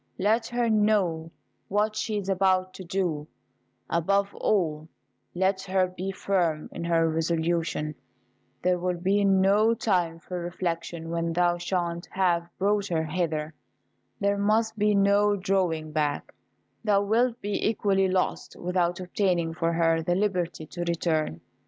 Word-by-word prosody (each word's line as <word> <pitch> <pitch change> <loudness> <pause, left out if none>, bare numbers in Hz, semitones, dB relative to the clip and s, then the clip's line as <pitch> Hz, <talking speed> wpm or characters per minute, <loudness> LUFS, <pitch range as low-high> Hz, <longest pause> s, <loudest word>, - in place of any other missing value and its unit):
Let 220 +4 +1
her 240 -1 0
know 205 -7 +2 0.4
what 210 +2 0
she 215 0 -2
is 200 -2 -4
about 185 -1 +2
to 190 - -9
do: 170 -5 -2 0.6
above 200 +4 +1
all, 160 -6 0 0.5
let 190 +1 +1
her 185 0 +2
be 185 +1 -5
firm 175 -5 -1
in 170 - -6
her 165 -1 +3
resolution. 160 -1 -1 0.7
There 180 0 +2
will 180 0 -1
be 195 +4 +1
no 200 +3 +4
time 180 -7 0
for 180 +2 -6
reflection 170 -1 -4
when 170 0 -1
thou 175 0 +2
shalt 175 -1 -2
have 175 -3 +1
brought 205 +1 +1
her 165 -3 0
hither. 160 -2 -2 0.7
There 200 0 +1
must 220 +2 +2
be 210 0 +2
no 200 +1 +4
drawing 185 -5 0
back: 150 -2 -1 0.5
thou 205 -2 +3
wilt 235 +3 +1
be 205 -2 -2
equally 195 -3 +2
lost, 185 0 -1
without 175 0 -1
obtaining 180 -3 0
for 165 +1 0
her 165 -1 +2
the 175 +2 0
liberty 180 -5 -1
to 175 - -11
return." 160 - -1
180 Hz, 140 wpm, -27 LUFS, 170-200 Hz, 0.7 s, no